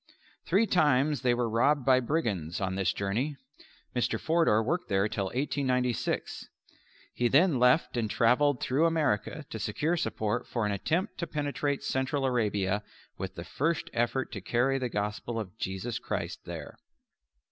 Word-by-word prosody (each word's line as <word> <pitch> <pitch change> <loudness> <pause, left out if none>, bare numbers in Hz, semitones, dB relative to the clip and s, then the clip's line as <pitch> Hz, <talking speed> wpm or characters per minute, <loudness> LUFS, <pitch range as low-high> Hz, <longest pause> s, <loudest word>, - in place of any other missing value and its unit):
Three 200 +6 +4
times 150 - +3
they 125 -2 +3
were 120 -1 0
robbed 125 +5 +2
by 130 -1 +5
brigands 110 - -1
on 95 -1 -1
this 95 -1 +1
journey. 115 +11 -2 0.6
Mr. 120 - 0
Forder 160 -10 +3
worked 170 +10 -1
there 100 +1 +2
till 100 -2 -2
1896. 125 +1 -1 0.6
He 120 - +1
then 145 +2 +4
left 125 +5 +4
and 115 -3 0
travelled 125 +5 +3
through 145 +6 +2
America 150 - 0
to 110 - -4
secure 145 +11 0
support 110 -8 -2
for 115 -3 -1
an 105 - 0
attempt 165 - -1
to 170 - -2
penetrate 145 -1 -2
Central 135 +1 -1
Arabia 105 -5 +1 0.4
with - - -5
the - - -6
first 165 +3 -1
effort 120 +3 0
to 100 - -6
carry 130 +7 +1
the 125 -2 -2
Gospel 105 +2 -3
of 100 -3 -6
Jesus 95 +5 -3
Christ - - -4
there. - - -8
125 Hz, 155 wpm, -29 LUFS, 105-145 Hz, 0.6 s, by